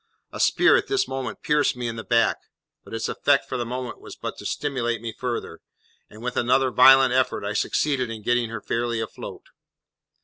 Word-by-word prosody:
A - - -8
spear - - +4
at - - -2
this 400 -1 +1
instant 130 -4 -5
pierced 150 -3 +2
me 120 -1 -3
in 115 - -4
the 110 - -6
back; 115 -1 +2 0.5
but - - -15
its 115 - -2
effect 140 -1 +1
for - - -4
the 120 -2 -2
moment 125 0 -5
was - - -10
but - - -6
to - - -5
stimulate 120 -5 -2
me 115 0 -6
further, 125 0 -4 0.5
and 110 +2 -13
with 125 0 -3
another 130 +2 +2
violent 130 0 +7
effort 130 -5 +1
I 100 - -2
succeeded 130 +3 0
in 110 -2 -7
getting 120 0 +1
her 115 -1 -6
fairly 115 +1 -2
afloat. 110 - -7
120 Hz, 200 wpm, -24 LUFS, 115-130 Hz, 0.5 s, violent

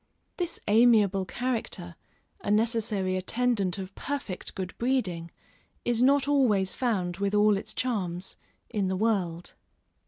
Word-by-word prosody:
This 350 -2 -2
amiable 210 -4 +4
character, 220 -7 -3 0.5
a - - -3
necessary 215 -3 +1
attendant 205 -1 +1
of 190 0 -6
perfect 275 -10 -4
good 185 -1 -4
breeding, 205 -10 0 0.6
is 240 -1 +1
not 275 +1 +4
always 220 -10 +3
found 190 -8 -1
with 200 +1 0
all 210 0 +5
its 195 - -5
charms, 190 -7 -2 0.4
in 205 -4 0
the 185 0 -1
world. 185 -6 -1
205 Hz, 125 wpm, -28 LUFS, 185-240 Hz, 0.6 s, all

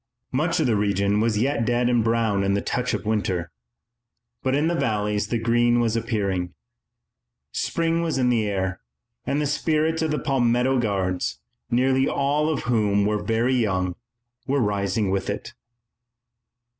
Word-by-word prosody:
Much 155 +6 0
of - - +2
the 115 - +2
region 100 0 +1
was 110 -1 +1
yet 130 +2 +1
dead 120 +1 +1
and 120 -2 +2
brown 115 -3 +1
from 100 0 +1
the - - +1
touch 125 0 -1
of - - -6
winter, 95 -6 -1 0.9
but 130 0 0
in 150 +3 +2
the 170 - +1
valleys 105 -8 0
the 120 - -1
green 120 +1 +2
was 115 -2 +1
appearing. 100 -6 -2 1.0
Spring 165 0 0
was 165 -4 -1
in 125 -1 +2
the 115 -3 +1
air, 95 -1 -2 0.5
and 145 - 0
the 150 - 0
spirits 155 +2 0
of 160 - 0
the 150 - 0
Palmetto 130 -2 +1
Guards, 95 -5 -1 0.3
nearly 130 +2 +2
all 145 +2 +1
of 155 - -1
whom 105 -4 +2
were 105 0 0
very 115 +3 +1
young, 95 -7 0 0.5
were 140 +1 +1
rising 100 -2 0
with 95 0 -1
it. - - -5
115 Hz, 160 wpm, -24 LUFS, 100-130 Hz, 1.0 s, of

